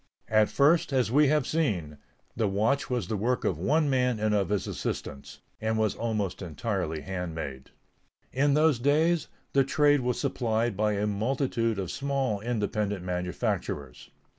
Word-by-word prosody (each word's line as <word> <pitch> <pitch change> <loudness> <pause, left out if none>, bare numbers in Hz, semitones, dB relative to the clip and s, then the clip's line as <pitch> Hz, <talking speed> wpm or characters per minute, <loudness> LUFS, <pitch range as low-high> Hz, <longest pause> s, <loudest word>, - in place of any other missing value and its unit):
At 110 -1 +4
first, 150 +3 +3
as 130 -4 +1
we 145 +3 +5
have 150 -1 +2
seen, 90 - -1 0.4
the 110 -1 +1
watch 110 +8 +1
was 120 -7 -1
the 110 - -2
work 120 +5 0
of 80 - 0
one 150 - +2
man 125 -4 +1
and 110 0 +1
of 100 -3 +1
his 105 -1 0
assistants, 70 -2 -5 0.2
and 110 0 0
was 110 -1 +1
almost 110 -5 -2
entirely 85 -1 -3
handmade. 80 -8 -5 0.6
In 140 +2 +3
those 155 -4 +3
days, 155 +6 +2 0.3
the 140 - +5
trade 145 +1 +3
was 125 -1 -1
supplied 115 -5 0
by 105 +1 +1
a 105 +1 0
multitude 115 +1 0
of 95 -3 -3
small 135 -6 -1
independent 105 -3 -2
manufacturers. 90 -6 -3
110 Hz, 155 wpm, -28 LUFS, 95-135 Hz, 0.6 s, we